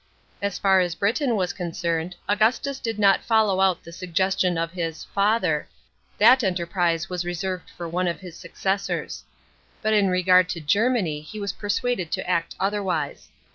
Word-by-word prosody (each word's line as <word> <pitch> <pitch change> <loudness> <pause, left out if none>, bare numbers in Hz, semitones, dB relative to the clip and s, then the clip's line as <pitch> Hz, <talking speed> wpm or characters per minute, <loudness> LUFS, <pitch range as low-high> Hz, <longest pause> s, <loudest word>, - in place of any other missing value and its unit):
As 200 -1 -2
far 190 -1 +4
as 175 -2 0
Britain 235 +5 +1
was 185 -2 -1
concerned, 170 -1 -3
Augustus 245 +7 +1
did 225 -3 -3
not 200 -2 +4
follow 215 -4 +2
out 190 -2 +2
the 170 - -11
suggestions 185 0 0
of 165 0 -1
his 165 -3 -4
" - - -30
father 200 -6 +1 0.3
"; - - -38
that 250 +4 +6
enterprise 175 -2 0
was 180 -1 -3
reserved 180 +1 -4
for 170 - -7
one 180 +2 -1
of 170 - -2
his 180 -3 -10
successors. 195 +2 -3 0.6
But 215 0 +2
in 205 -2 +4
regard 180 0 +4
to 170 - -3
Germany 185 -1 +1
he 210 +8 -9
was 200 -1 -3
persuaded 205 -3 -2
to - - -2
act 170 -2 -1
otherwise. 190 -7 -2
185 Hz, 170 wpm, -24 LUFS, 170-205 Hz, 0.6 s, that